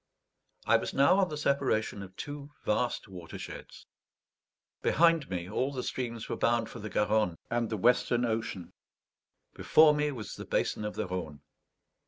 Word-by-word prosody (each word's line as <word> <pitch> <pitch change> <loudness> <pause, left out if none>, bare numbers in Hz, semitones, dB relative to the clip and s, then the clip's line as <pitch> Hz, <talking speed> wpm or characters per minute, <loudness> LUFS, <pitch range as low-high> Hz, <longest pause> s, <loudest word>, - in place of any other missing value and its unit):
I - - +5
was - - -5
now 140 +8 +5
on 190 - +2
the 150 - -4
separation 135 -8 0
of 95 -1 -10
two 145 +3 -7 0.2
vast 120 +3 0
watersheds; 90 -4 -9 1.0
behind 165 -3 +3
me 90 -2 -3
all 130 +7 -1
the 130 -2 -4
streams 115 -3 -4
were - - -2
bound 115 -1 +1
for 125 - -8
the 110 0 -6
Garonne 105 -5 +1
and 120 -2 0
the 110 - -2
Western 120 +2 +3
Ocean; 110 -5 -3 0.8
before 155 -1 +5
me 150 0 0
was 115 -7 -7
the - - -7
basin 105 - -1
of 105 - -4
the - - -2
Rhone. 85 -6 -5
115 Hz, 160 wpm, -30 LUFS, 105-140 Hz, 1.0 s, I